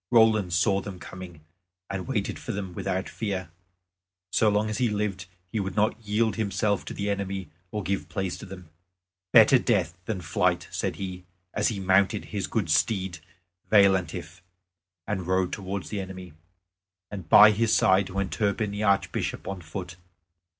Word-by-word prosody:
Roland 110 -5 +4
saw 95 +3 +2
them 95 -1 -7
coming, 90 -3 -10 0.5
and 95 -1 -5
waited 110 -7 -2
for - - -5
them 95 -3 -5
without 95 +1 -2
fear. 95 -6 -4 0.8
So 110 - +4
long 105 +1 +1
as 110 +3 -3
he 125 -2 +2
lived 100 -3 -2 0.2
he 110 - -1
would 95 -2 -3
not 110 +2 +1
yield 110 +2 0
himself 100 -1 0
to - - -6
the 100 - -3
enemy 100 -2 -3 0.2
or 105 +2 -4
give 95 +2 -2
place 95 -3 -2
to 110 - -9
them. 90 -4 -11 0.6
"Better 115 +3 +7
death 95 -9 +1
than 110 -4 -2
flight," 85 0 0
said - - -2
he, 95 -2 -6 0.3
as 105 - +1
he 110 -5 -2
mounted 95 +2 +2
his 100 -2 -2
good 105 -7 -1
steed 95 0 +1 0.5
Veillantif, 95 -3 +2 0.6
and 95 -5 -3
rode 95 -1 +1
towards 100 -1 -4
the 105 -2 -3
enemy. 95 -3 -8 0.8
And 95 -5 -7
by 105 0 +9
his 110 +1 +1
side 95 -1 +4
went 100 0 -2
Turpin 105 0 0
the 105 +1 -4
Archbishop 100 -2 0
on 95 -2 -4
foot. 85 +1 -7
100 Hz, 165 wpm, -26 LUFS, 95-105 Hz, 0.8 s, by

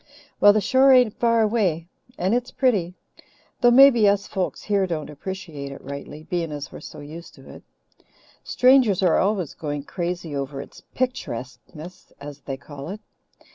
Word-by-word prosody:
"Well, 205 - +8
the 215 +1 +1
shore 265 +6 +4
ain't 250 -5 +5
far 230 -1 +3
away, 200 -7 0 0.3
and 185 +4 0
it's 245 +1 -1
pretty 195 -10 0 0.6
though 245 - +5
maybe 240 -4 +7
us 200 0 0
folks 190 -3 -4
here 200 -2 +1
don't 155 -4 -4
appreciate 150 -3 -7
it 135 - -9
rightly, 140 +2 -8
being 165 -1 -3
as 145 -1 -6
we're - - -9
so - - -11
used 160 +4 -11
to - - -17
it. - - -12 0.8
Strangers 250 -7 +3
are 180 - +4
always 190 -5 0
going 145 -2 -5
crazy 175 -2 -4
over 140 0 -4
its 140 - -11
'picturesqueness,' 165 - -6
as 145 0 -9
they 135 -1 -6
call 140 +1 -10
it. 205 +3 -6
180 Hz, 165 wpm, -23 LUFS, 150-220 Hz, 0.8 s, Well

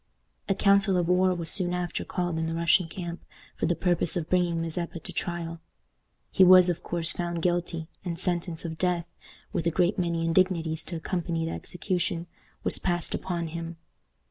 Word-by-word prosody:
A 195 - +3
council 200 -1 +4
of 175 -2 +1
war 185 +1 +3
was 170 -2 -1
soon 180 -3 +2
after 175 -1 -2
called 175 -3 -2
in 160 - -1
the 165 - -2
Russian 170 +1 +3
camp 175 0 -6 0.3
for - - -1
the 175 - +2
purpose 175 0 +1
of 165 -2 -4
bringing 175 -2 +2
Mazeppa 170 +1 -3
to 180 +3 -8
trial. 170 -1 -3 0.7
He 190 - +5
was, 185 0 +8
of 175 - -1
course, 165 -2 0
found 170 0 -3
guilty, 175 -2 -1 0.2
and 170 -2 -3
sentence 175 -1 -1
of 160 -1 -5
death 180 -2 +1 0.5
with 165 - 0
a - - +5
great 180 +4 +1
many 170 -2 0
indignities 165 -2 +1
to 170 - -4
accompany 165 0 -2
the 165 - -3
execution 180 -2 -2 0.4
was - - +1
passed 175 -3 0
upon 170 -3 -2
him. 165 +1 -6
175 Hz, 180 wpm, -27 LUFS, 165-180 Hz, 0.7 s, was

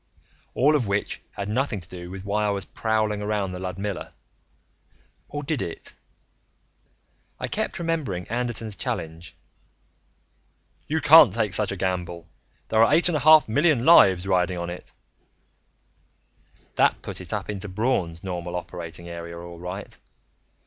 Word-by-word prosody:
All 150 +4 +4
of 125 -7 0
which 100 +1 -2
had 100 0 -5
nothing 115 0 -1
to 85 - -11
do 90 -1 -9
with 95 +1 -8
why 105 +1 0
I - - +1
was 100 -1 -2
prowling 110 -2 -1
around 105 -2 -1
the 90 - -6
Ludmilla 95 +1 -5 1.2
or 145 0 -5
did 150 -2 -2
it? 85 - -6 1.5
I - - -3
kept - - -2
remembering 155 - -2
Anderton's 115 -2 -3
challenge: 80 -1 -5 1.5
"You 160 +1 -1
can't 150 - +8
take 105 -2 -1
such 100 -1 0
a - - -3
gamble. 90 -2 -3 0.4
There 110 0 +4
are 115 - +4
eight 165 +4 +5
and 170 - 0
a - - +1
half 155 +1 +7
million 145 +1 +2
lives 95 - +7
riding 90 -1 +1
on 85 0 -4
it 90 - -9 0.9
" - - -38
That - - +3
put - - -5
it - - -5
up - - -3
into 105 -1 -5
Braun's 95 -5 -1
normal 90 -2 -4
operating 85 -1 -7
area, 85 0 -7
all 85 0 -9
right. 90 +3 -7
100 Hz, 150 wpm, -24 LUFS, 90-120 Hz, 1.5 s, can't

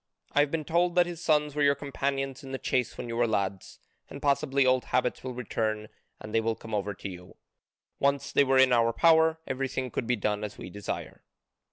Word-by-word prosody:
I - - +2
have 145 0 +4
been 160 +1 -2
told 175 +2 +1
that 175 -1 +5
his 175 -1 -7
sons 150 -2 +2
were 150 - -2
your 140 0 +4
companions 135 0 -3
in 135 - -8
the 135 - -2
chase 125 -2 -1
when - - -5
you 115 - -4
were 120 0 +2
lads, 100 -3 -2 0.3
and 140 - -8
possibly 140 -1 +2
old 130 0 +3
habits 125 -1 0
will 130 -1 -5
return 110 -3 -2 0.3
and 105 - -9
they 115 - +3
will 115 0 0
come 110 0 -10
over 105 -1 -1
to 100 - -7
you. 90 -1 -11 0.6
Once 140 0 +1
they - - +5
were 135 -1 +2
in 130 -1 +6
our 115 -1 +3
power, 160 +2 +4
everything 130 -1 -3
could 115 - -3
be 125 - +2
done 105 -1 -1
as 105 -1 -6
we - - -8
desire." 105 +1 -6
130 Hz, 220 wpm, -28 LUFS, 110-140 Hz, 0.6 s, in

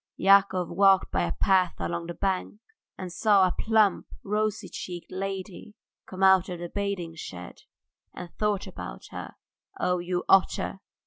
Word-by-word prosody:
Yakov 195 -2 +4
walked 195 +2 +3
by 90 - 0
a 85 -1 -1
path 185 - +2
along 170 0 -4
the 170 - -6
bank 195 +1 -2 0.4
and 180 -2 -7
saw 200 0 +4
a 180 - +1
plump, 220 -1 +2 0.2
rosy 210 +1 -1
cheeked 175 -2 -8
lady 195 +2 -6 0.3
come 190 0 -5
out 190 -1 +5
of 180 - -4
the 175 0 -6
bathing 200 -4 -3
shed, 90 - -9 0.5
and 175 - -9
thought 210 -2 -1
about - - -9
her: - - -8 0.4
"Ugh! 180 0 +1
you 175 0 -2
otter!" 195 0 +2
190 Hz, 150 wpm, -27 LUFS, 175-200 Hz, 0.5 s, out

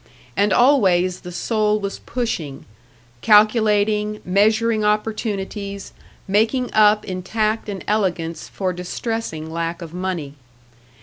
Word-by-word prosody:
And 205 0 +2
always 185 -8 +3
the 180 - -9
soul 215 +3 0
was 200 -1 -5
pushing; 200 - -4 0.6
calculating, 210 -1 +3
measuring 215 +3 +2
opportunities, 210 -2 -2 0.3
making 225 +6 +1
up 210 0 +4
in 185 -1 -4
tact 215 +3 -1
and 195 -2 -5
elegance 175 -6 -1
for 185 -2 -3
distressing 180 -3 -4
lack 165 +1 -3
of 165 -1 -10
money. 180 -6 -4
210 Hz, 110 wpm, -21 LUFS, 180-215 Hz, 0.6 s, up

